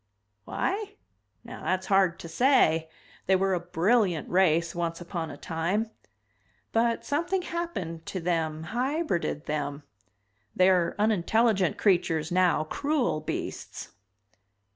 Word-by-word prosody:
"Why? 410 +1 -2 0.5
Now - - -10
that's 185 0 0
hard 190 -3 +3
to - - -7
say. 165 - +3 0.4
They 190 - +5
were 190 0 +1
a 180 - +1
brilliant 175 +1 +1
race 170 -2 +3
once 170 -1 -2
upon 170 -2 -4
a 145 - -8
time. 180 +9 -2 0.8
But 230 0 +1
something 350 +6 0
happened 200 - -4
to 190 - -3
them, 160 -2 -1
hybrided 250 - -1
them. 145 -1 -3 0.7
They 185 +1 +5
are 180 -2 +2
unintelligent 210 -1 +2
creatures 175 -4 +1
now, 180 -4 +3
cruel 280 - 0
beasts." 155 - -5
185 Hz, 120 wpm, -27 LUFS, 165-230 Hz, 0.8 s, They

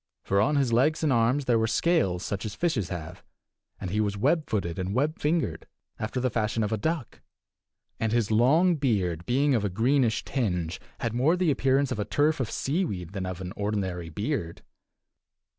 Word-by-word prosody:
For 100 +1 +2
on 150 +7 +2
his 135 -4 +2
legs 150 +7 +2
and 150 -4 +3
arms 120 +4 +2
there 120 -3 +3
were 110 - +1
scales 110 - +1
such 100 -1 -3
as 110 - -5
fishes 135 - 0
have; 80 -3 -7 0.6
he 105 +5 0
was 100 -1 -1
web 150 +8 +1
footed 90 -5 -2
and 95 +3 -2
web 150 +5 0
fingered, 155 0 -1 0.3
after 110 +4 -2
the 130 0 0
fashion 110 0 0
of 105 - -2
a 110 - +1
duck; 160 +2 -3 0.8
and 110 -1 0
his 115 -2 +1
long 155 +11 +4
beard, 95 - 0
being 140 +3 +2
of 115 -5 +1
a 105 - 0
greenish 115 +3 +1
tinge, 90 - -2 0.2
had 115 -3 -1
more 135 +8 +3
the 180 -4 +2
appearance 135 0 +2
of 110 - -2
a 105 - -1
turf 150 +1 +1
of 130 - -1
seaweed 130 - -2
than 95 -2 -3
of 95 0 -5
an 90 +1 -6
ordinary 95 -5 -2
beard. 95 - -3
115 Hz, 190 wpm, -27 LUFS, 100-140 Hz, 0.8 s, long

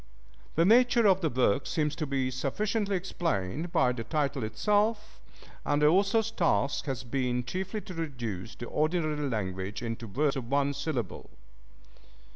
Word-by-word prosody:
The 165 - +4
nature 240 +2 +5
of 190 -2 +5
the 160 - +1
work 130 0 +1
seems 150 -2 0
to 155 - -2
be 135 -2 0
sufficiently 200 - -1
explained 165 - -2
by 125 - +3
the 120 -2 -4
title 140 -1 -1
itself, 210 - 0 0.4
and 145 - +1
the 150 0 +5
author's 205 +5 +3
task 165 -8 +1
has 130 -3 -3
been 125 0 -1
chiefly 190 - -4
to 185 - -9
reduce 120 - -5
the 120 - -7
ordinary 155 0 0
language 100 0 -3
into 115 0 -4
words 140 +7 0
of 125 -3 -5
one 140 +1 +2
syllable. 140 - -4
145 Hz, 150 wpm, -29 LUFS, 125-180 Hz, 0.4 s, nature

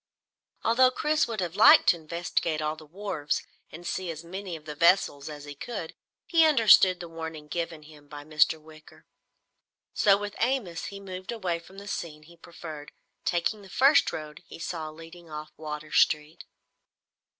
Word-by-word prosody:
Although 255 +3 +5
Chris 300 +4 +1
would 225 -4 -3
have 175 -1 -3
liked 210 - +8
to - - +5
investigate 165 -1 -2
all 155 0 -1
the 155 -1 -14
wharves 160 -4 -3 0.3
and 170 +2 -10
see 185 0 -3
as 160 0 -6
many 185 +1 -6
of 155 -1 -12
the 150 - -6
vessels 160 -3 +3
as 145 -1 -9
he 145 - -8
could, 165 +2 -6 0.3
he 330 -2 +4
understood 220 - +6
the 175 - -7
warning 160 -2 -7
given 165 0 -4
him 150 -1 -16
by 145 0 -9
Mr. 155 +1 +2
Wicker. 155 0 -17 0.9
So 200 -1 +4
with 205 0 -6
Amos 230 -9 -1
he 200 - -7
moved 185 0 -7
away 185 -7 -2
from 190 +3 -16
the 200 +1 -10
scenes 155 -6 -5
he 170 +2 -16
preferred, 160 -3 -10 0.3
taking 180 +5 0
the 195 - -14
first 275 +8 +4
road 150 0 -7
he - - -10
saw 165 -2 -5
leading 165 +2 -13
off 150 0 -7
Water 150 0 -7
Street. 150 +1 +2
170 Hz, 175 wpm, -27 LUFS, 155-195 Hz, 0.9 s, liked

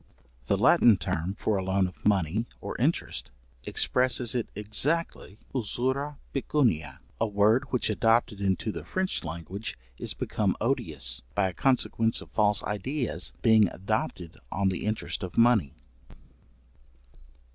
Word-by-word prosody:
The - - +2
Latin 115 -4 +6
term 85 +2 -2
for 110 -1 0
a 95 - -2
loan 95 0 +2
of 90 - -8
money 100 +2 +1
or - - -6
interest, - - -1 0.4
expresses 125 -2 +1
it 120 -3 -1
exactly, 110 +3 -1 0.2
usura 130 +4 -2 0.2
pecuniæ, 110 - 0 0.2
a 115 - +2
word 105 +6 +3
which 130 -3 -1
adopted 115 -1 +2
into 95 +2 0
the - - -6
French 185 0 -2
language 85 +6 -6 0.2
is - - -4
become - - -1
odious, - - -1
by 95 -2 +2
a - - -8
consequence 115 0 +1
of - - -11
false 105 -1 +2
ideas 110 - -1
being 110 -3 +6
adopted 95 -3 -3
on 95 0 +1
the 95 - -3
interest 110 0 -2
of 90 -3 -6
money. 110 - +4
105 Hz, 135 wpm, -28 LUFS, 95-120 Hz, 0.4 s, Latin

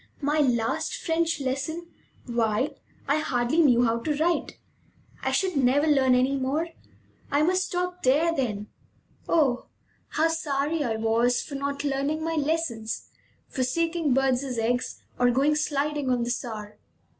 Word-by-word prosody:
My 295 +2 +2
last 240 - +1
French 335 -7 0
lesson! 280 +6 -3 0.3
Why, 235 +3 0 0.3
I 285 +2 +2
hardly 245 +1 0
knew 250 -7 +5
how 230 0 +1
to 300 +5 -1
write! 335 +3 0 0.6
I - - 0
should 375 -3 +1
never 275 +2 +3
learn 270 -4 +4
any 260 +2 +2
more! 285 +6 -1 0.6
I 285 +1 +2
must 370 +3 +2
stop 360 0 -3
there, 305 +6 +3
then! 220 -9 -2 0.6
Oh, 275 -7 +2 0.4
how 320 +1 +1
sorry 310 -1 -1
I 230 -4 -1
was 230 +2 +2
for 290 - -10
not 280 +1 -3
learning 285 +2 -1
my 330 - -1
lessons, 295 -8 -2 0.4
for 260 - -4
seeking 330 +3 0
birds' 265 -1 +1
eggs, 245 +2 -1 0.2
or 245 0 +4
going 275 +5 +3
sliding 295 -2 -1
on 245 -2 +1
the 240 - -1
Saar! 215 -4 -5
275 Hz, 145 wpm, -26 LUFS, 245-315 Hz, 0.6 s, knew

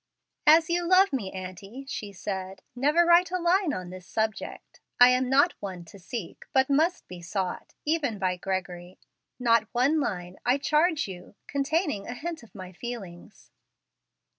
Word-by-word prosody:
"As 320 +1 +7
you 345 0 0
love 375 -1 +5
me, 205 -8 -2
aunty," 190 +7 -8
she 210 -6 -5
said, 190 0 -5
"never 295 +7 +3
write 345 +1 +5
a 365 - -1
line 355 0 +2
on 180 -7 -5
this 185 0 -10
subject. 220 -1 -4 0.2
I 245 0 +9
am 250 0 +2
not 285 +6 +4
one 185 -3 -6
to 195 +4 -14
seek, 190 0 -7
but 265 +1 +3
must 325 +6 +1
be 180 -1 -9
sought, 185 +1 -4
even 295 -8 0
by 185 -2 0
Gregory. 180 -1 -4 0.4
Not 230 -3 +3
one 270 +6 +3
line, 180 -9 -3
I 250 +3 +3
charge 305 +1 +2
you, 180 +1 -10
containing 280 - -1
a 245 - -5
hint 330 +4 -5
of 230 -5 -18
my 185 -2 -8
feelings." 195 -3 -9
240 Hz, 165 wpm, -27 LUFS, 190-300 Hz, 0.4 s, I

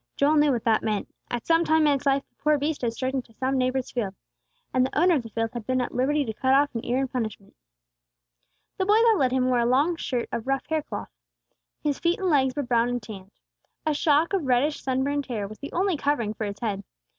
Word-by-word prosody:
Joel 295 +2 +3
knew 295 -1 +4
what 240 -4 -1
that 225 -2 +3
meant. 215 -2 -2 0.2
At 240 -1 -3
some 330 0 +3
time 315 -1 +3
in 295 - +4
its 280 +1 -2
life 275 0 +2
the - - -47
poor 300 +1 +2
beast 295 +2 -2
had 235 -2 0
strayed 260 +3 -3
into 250 -4 -4
some 260 +4 -1
neighbor's 255 0 0
field, 205 -6 -3 0.6
and 255 - +3
the 260 - -1
owner 355 +2 +5
of 295 - +2
the 230 - -10
field 225 +1 -2
had 240 -3 -6
been 255 0 +1
at 250 - -2
liberty 285 +3 +1
to 220 - -4
cut 260 +4 +2
off 285 +1 +3
an 230 - -4
ear 245 +1 0
in 270 0 0
punishment. 220 -5 -5 1.2
The 380 - +1
boy 415 - +5
that 455 -1 +5
led 255 -2 +2
him 255 0 +1
wore 250 -1 +2
a 235 - +2
long 285 +8 +3
shirt 245 -6 -2
of 230 - -4
rough 270 -1 0
hair 315 -1 +1
cloth. - - -7 0.7
His 290 -2 0
feet 340 +1 +1
and 375 -2 0
legs 265 -3 +2
were 290 - -1
brown 240 -1 +2
and 245 0 -1
tanned. 195 -3 -9 0.6
A 310 - +2
shock 305 +4 +2
of 360 -8 0
reddish 260 +4 +2
sunburned 270 +2 -1
hair 215 -6 -3
was 215 +1 -11
the 285 - -7
only 370 -1 +1
covering 280 -7 0
for 220 - -4
his 200 0 -5
head. 205 -4 -2
260 Hz, 250 wpm, -25 LUFS, 240-295 Hz, 1.2 s, owner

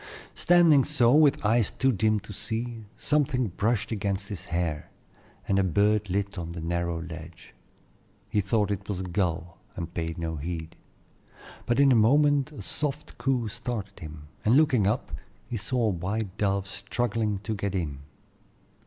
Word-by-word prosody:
Standing 170 -5 +5
so, 125 -5 +4
with 150 -6 +4
eyes 110 0 +3
too 125 +3 +1
dim 110 0 +2
for 105 +1 -10
seeing, 110 +1 -4
something 140 -5 +1
brushed 105 +5 -1
against 100 -1 -2
his 95 -3 -6
hair, 85 -4 -2 0.6
and 95 - +2
a - - +3
bird 105 +3 +2
lit 100 +1 -2
on 85 -1 -5
the 85 - -6
narrow 85 0 -2
ledge. 80 0 -10 0.7
He 105 - +1
thought 105 +1 +1
it 100 0 -4
was 95 -3 -2
a - - -3
gull, 85 -2 -2 0.2
and 85 -1 -6
paid 80 -1 -3
no 80 -1 -3
heed; 80 +1 -5 0.9
but 120 +2 +2
in 140 -1 +6
a - - +5
moment 145 +5 +4
a 150 - -9
soft 150 0 -2
coo 130 -4 0
started 110 -3 -5
him, 75 -1 -9 0.2
and 115 +5 +5
looking 135 -10 +4
up, 110 - -1 0.3
he 120 - -5
saw 120 +3 -1
a - - +3
white 95 +2 -3
dove 100 -2 0
struggling 110 +1 -1
to 110 - -2
get 100 -1 -3
in. 75 -7 -2
105 Hz, 165 wpm, -27 LUFS, 90-120 Hz, 0.9 s, in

